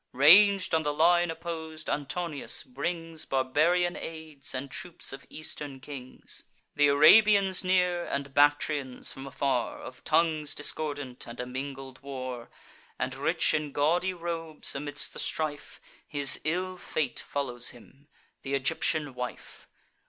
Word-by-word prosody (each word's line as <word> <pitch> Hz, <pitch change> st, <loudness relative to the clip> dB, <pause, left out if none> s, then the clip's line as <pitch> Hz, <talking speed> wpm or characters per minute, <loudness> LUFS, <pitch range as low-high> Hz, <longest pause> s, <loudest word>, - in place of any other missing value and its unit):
Rang'd 190 Hz, +8 st, +7 dB
on 160 Hz, -, +4 dB
the 150 Hz, -1 st, -2 dB
line 175 Hz, +2 st, +4 dB
oppos'd, 160 Hz, -1 st, -5 dB
Antonius 150 Hz, +1 st, -2 dB
brings 165 Hz, -9 st, -4 dB
Barbarian 155 Hz, +7 st, +2 dB
aids, 160 Hz, -5 st, -6 dB
and 130 Hz, +1 st, -5 dB
troops 180 Hz, -4 st, -2 dB
of 135 Hz, -2 st, -10 dB
Eastern 145 Hz, -3 st, -6 dB
kings; 130 Hz, -2 st, -8 dB, 0.3 s
Th' 145 Hz, 0 st, +5 dB
Arabians 195 Hz, +7 st, +6 dB
near, 180 Hz, -1 st, +2 dB
and 140 Hz, 0 st, -3 dB
Bactrians 145 Hz, -2 st, +2 dB
from 135 Hz, 0 st, -9 dB
afar, 135 Hz, -3 st, -1 dB
Of 130 Hz, -, -11 dB
tongues 155 Hz, -2 st, +1 dB
discordant, 145 Hz, -4 st, -2 dB
and 120 Hz, +1 st, -9 dB
a 125 Hz, -, -3 dB
mingled 135 Hz, +1 st, -7 dB
war: 130 Hz, -3 st, -6 dB, 0.5 s
And, -, -, -2 dB
rich -, -, +1 dB
in 150 Hz, -2 st, -1 dB
gaudy 175 Hz, +6 st, +1 dB
robes, 165 Hz, -2 st, -2 dB
amidst 145 Hz, +1 st, -2 dB
the -, -, -7 dB
strife, 150 Hz, -2 st, -3 dB, 0.3 s
His 145 Hz, -2 st, +4 dB
ill 185 Hz, +4 st, -1 dB
fate 145 Hz, -8 st, -2 dB
follows 125 Hz, -4 st, -1 dB
him—th' 135 Hz, +4 st, -18 dB
Egyptian 145 Hz, +1 st, 0 dB
wife. 125 Hz, 0 st, -7 dB
150 Hz, 130 wpm, -28 LUFS, 135-170 Hz, 0.5 s, Rang'd